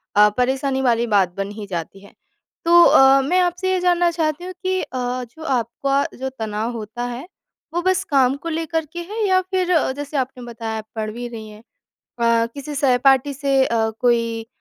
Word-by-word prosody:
अ, 210 0 +7
परेशानी 265 +1 0
वाली 235 -2 +2
बात 195 -5 +2
बन 195 +1 -3
ही 210 0 -7
जाती 175 +1 -5
है। 200 - -17 0.5
तो 345 +1 +7
अ, 270 0 +6
मैं 360 +7 +1
आपसे 360 +1 0
ये 370 - +1
जानना 350 -1 +3
चाहती 320 0 -2
हूँ 370 - -6
कि 375 0 0
अ, 250 0 -3
जो 315 +7 -13
आपका 275 +1 0 0.2
जो 265 0 -3
तनाव 220 +2 -2
होता 225 +3 -6
है, 245 +7 -6 0.5
वो 345 - 0
बस 375 0 +1
काम 270 -2 +3
को - - -1
लेकर 325 0 -2
के 345 - -5
है, 425 +5 -3
या 370 0 +3
फिर 370 -1 -1 0.2
जैसे 290 +1 -5
आपने 255 -1 -3
बताया 225 -2 -5
आप 215 0 -8
पढ़ 215 -1 -3
भी 240 +2 -6
रही 220 -2 -9
हैं। 210 +1 -14 0.6
अ, 230 0 +3
किसी 290 +1 -7
सहपाठी 270 0 +3
से 275 -1 +2
अ, 225 -2 0
कोई 230 -2 +1
265 Hz, 195 wpm, -21 LUFS, 230-320 Hz, 0.6 s, अ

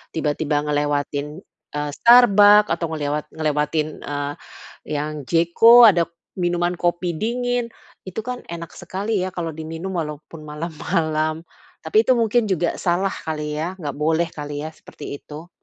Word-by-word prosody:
tiba-tiba 150 -1 0
ngelewatin, 145 +2 -2 0.3
eee, 145 0 -2
Starbucks, 210 0 +6
atau 165 - -1
ngelewat 150 -1 -3
ngelewatin, 155 0 -1
eee, 145 0 -4 0.6
yang 150 -1 -4
J.CO 175 +9 +6
ada 170 -2 +1 0.3
minuman 175 0 0
kopi 175 0 0
dingin. 245 +1 -1 0.4
Itu 185 +4 -5
kan 250 +1 -5
enak 170 -1 -7
sekali 205 +3 -2
ya 185 - -1
kalau 165 -2 -3
diminum 160 +4 -6
walaupun 150 +1 -7
malam-malam. 155 0 -2 0.4
Tapi 215 +8 +2
itu 255 - +5
mungkin 235 -1 +2
juga 175 -4 -1
salah 180 +2 0
kali 150 -3 -5
ya, 165 +4 -3
nggak 150 -8 -6
boleh 160 +2 +1
kali 145 -2 -6
ya 155 - -5
seperti 150 -2 -10
itu? 155 +4 -11
165 Hz, 140 wpm, -21 LUFS, 150-190 Hz, 0.6 s, Starbucks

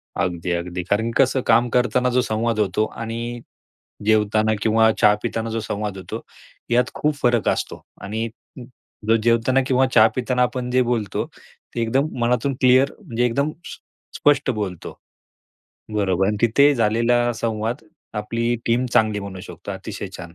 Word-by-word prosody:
अगदी, 90 -2 -2
अगदी. 85 +1 -3
कारण 110 +5 0
की 135 - +4
कसं 130 0 0
काम 120 +1 +4
करताना 125 +1 +2
जो 125 +1 +2
संवाद 115 0 -1
होतो 105 +1 +1
आणि 115 +2 -5 0.7
जेवताना 110 0 +3
किंवा 110 0 +4
चहा 105 0 +5
पिताना 115 -1 -3
जो 115 0 -2
संवाद 105 -2 -4
होतो 95 - -6 0.5
यात 125 +1 +2
खूप 150 0 0
फरक 120 -2 +2
असतो - - -2 0.2
आणि 110 +3 -3 0.8
ज 115 - +5
जेवताना 120 +3 +3
किंवा 130 0 +3
चहा 110 0 +8
पिताना 125 0 0
आपण 125 0 -1
जे 130 +1 +3
बोलतो, 115 -5 -1
ते 120 - -11
एकदम 135 +6 +1
मनातून 125 +3 +1
क्लिअर 130 +2 +5
म्हणजे 120 -6 -1
एकदम 140 +5 0
स्प - - -9 0.4
स्पष्ट 145 -2 +3
बोलतो. 100 -7 -5 0.9
बरोबर 95 -3 +1
आणि 105 +1 0
तिथे 140 +5 +4
झालेला 120 +1 +2
संवाद 115 +4 -3 0.4
आपली 115 +2 -1
टीम 120 +2 +2
चांगली 110 -2 +2
बनवू 95 -2 -7
शकतो. - - -9
अतिशय - - -6
छान. 85 0 -10
115 Hz, 155 wpm, -22 LUFS, 105-125 Hz, 0.9 s, चहा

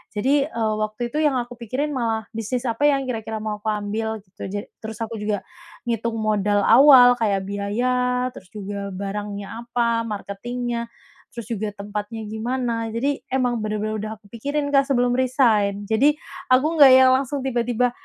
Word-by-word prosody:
Jadi, 275 +6 +2
eee, 225 -7 -1
waktu 215 +3 -3
itu 305 - 0
yang 290 -3 +3
aku 245 0 -6
pikirin 255 +6 -2
malah 225 -3 -1
bisnis 225 +3 -2
apa 235 +5 +2
yang 275 -1 +1
kira-kira 225 -2 -4
mau 210 -1 -3
aku 220 - -7
ambil 215 +1 -3
gitu 190 -1 -9
ja 205 +2 -3 0.2
terus 220 -1 -7
aku 225 0 -5
juga 210 -1 -2 0.4
ngitung 230 0 -1
modal 205 -1 +1
awal 255 -1 +8
kayak 200 -4 +1
biaya 250 +5 0
terus 185 - -12
juga 200 -1 -5
barangnya 200 +1 -5 0.2
apa 235 -1 +1
marketingnya 235 +3 -4 0.5
terus 235 -2 -7
juga 215 -1 -2
tempatnya 210 +2 -5
gimana, 230 0 -2
jadi 275 +4 0
emang 250 -2 0
bener-bener 215 0 -2
udah 215 +1 -4
aku 210 - -21
pikirin, 285 +5 -2
Kak, 275 -1 +4
sebelum 245 -2 +2
resign 225 -6 +2
jadi 275 +7 +4 0.4
aku 255 +3 +5
nggak 275 -2 +10
yang 260 0 +7
langsung 275 +1 -1
tiba-tiba 245 -1 +1
230 Hz, 165 wpm, -22 LUFS, 210-250 Hz, 0.5 s, nggak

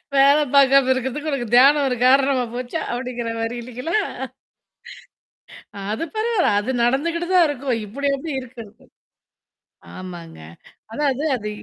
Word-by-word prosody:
வேல 280 +2 +6 0.2
பாார்க்காம 275 -1 +5
இருக்கிறதுக்கு 265 +4 -3
உனக்கு 245 -4 -2
தியானம் 280 +3 +6
ஒரு 250 - -1
காரணமா 265 -1 +3
போச்சா? 250 +6 -4
அப்படிங்கிற 245 -2 -4
மாரி 225 +1 -3
இல்லைங்களா? 250 - -5 1.8
அ. - - -6
அது 225 - -3
பரவால்ல. 435 - +1
அது 240 +5 -4
நடந்துகிட்டு 335 +7 0
தான் 350 -3 +6
இருக்கும். 275 -3 -2
இப்படி 280 +7 -3
அப்படி 305 +3 -6
இருக்கிறதுக்கு. 230 -2 -13 1.1
ஆமாங்க. 175 - -9 0.5
அதாவது 280 +1 -1
அது 210 -3 -5
265 Hz, 125 wpm, -21 LUFS, 240-290 Hz, 1.8 s, வேல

